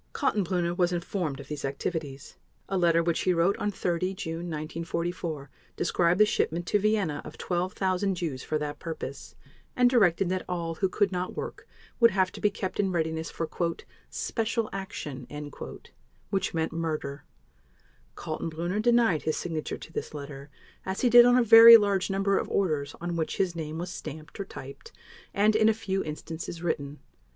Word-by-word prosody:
Kaltenbrunner 180 -4 0
was 180 -1 +2
informed 175 -5 -2
of 140 - -9
these 150 -1 -5
activities. 140 0 -4 0.3
A 195 - -2
letter 170 -2 +3
which 170 -1 0
he 185 -1 +2
wrote 170 +4 +3
on 210 - -1
30 185 -1 -1
June 165 0 -5
1944 165 -1 -4 0.2
described 175 +2 +1
the 215 - +8
shipment 175 -4 0
to 205 - +2
Vienna 205 -8 +1
of 150 - -10
12,000 185 +1 -1
Jews 155 -7 -3
for 155 - -1
that 150 -1 -4
purpose, 150 -4 -7 0.4
and 250 0 +4
directed 195 -6 +4
that 185 0 -1
all 170 -2 -2
who 185 +4 0
could 200 0 +1
not 180 0 -3
work - - -6 0.3
would 235 -1 +7
have 190 -3 +1
to - - -10
be 210 - +4
kept 195 -2 -5
in 195 -2 +2
readiness 160 -1 -1
for 165 - -4 0.6
"special 225 -1 -2
action," 150 - -6 1.0
which 195 -1 0
meant 160 0 0
murder. 155 -4 -3 0.9
Kaltenbrunner 170 +5 -3
denied 235 -8 +3
his 155 - -1
signature 160 -3 -3
to 165 - -12
this - - -5
letter, 140 -1 -8 0.3
as 190 +1 -3
he 245 - +3
did 240 0 +10
on 245 0 +5
a 250 - +5
very 230 +1 +11
large 200 -3 0
number 195 0 +1
of - - -4
orders 150 -7 0
on 175 0 -3
which 160 -1 -2
his 180 -3 0
name 160 -1 -5
was 175 +2 -4
stamped 155 +3 -8
or 200 - -3
typed, 135 -7 -10 0.4
and, 210 +2 +3
in 220 0 +5
a 220 - +2
few 195 -3 -2
instances, 160 +2 -6
written. 145 -4 -2
175 Hz, 170 wpm, -28 LUFS, 160-195 Hz, 1.0 s, very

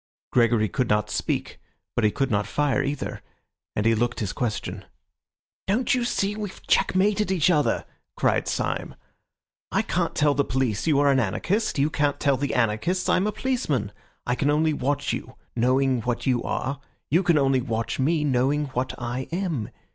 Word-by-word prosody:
Gregory 115 -3 +3
could 125 +3 -1
not 105 0 +1
speak, - - -2 0.4
but - - +1
he 105 - +5
could 135 +4 -1
not 105 -1 +1
fire 145 -5 +1
either, 140 +1 -3 0.5
and 105 - 0
he 115 - +5
looked 120 +2 0
his 100 -4 -2
question. 120 -4 -3 0.8
"Don't 220 +6 +2
you 250 -1 +1
see 205 -3 0
we've 210 -3 -7
checkmated 200 +2 +2
each 180 -2 +3
other?" 150 -4 +1 0.3
cried - - +1
Syme. - - -2 0.8
"I - - +2
can't - - -1
tell 145 -1 +3
the 140 - +2
police 125 -1 -1
you 150 -3 +4
are 145 -1 +4
an 135 - +3
anarchist. 170 - 0
You 145 +3 +2
can't 145 -2 0
tell 140 -1 +3
the 140 +2 -2
anarchists 125 - +1
I'm 185 +3 +3
a - - 0
policeman. 210 - -1 0.3
I 125 - +1
can 140 +3 0
only 155 +1 +2
watch 145 +1 -1
you, - - -6 0.2
knowing 130 +1 +2
what 120 +1 -2
you 125 -3 +2
are; 140 +2 -3 0.3
you 170 +5 +4
can 175 -4 +3
only 135 -2 +3
watch 115 -1 -2
me, 150 +3 +2
knowing 140 +2 +1
what 125 +1 -2
I 120 +2 -4
am. 170 - -2
140 Hz, 180 wpm, -25 LUFS, 120-160 Hz, 0.8 s, he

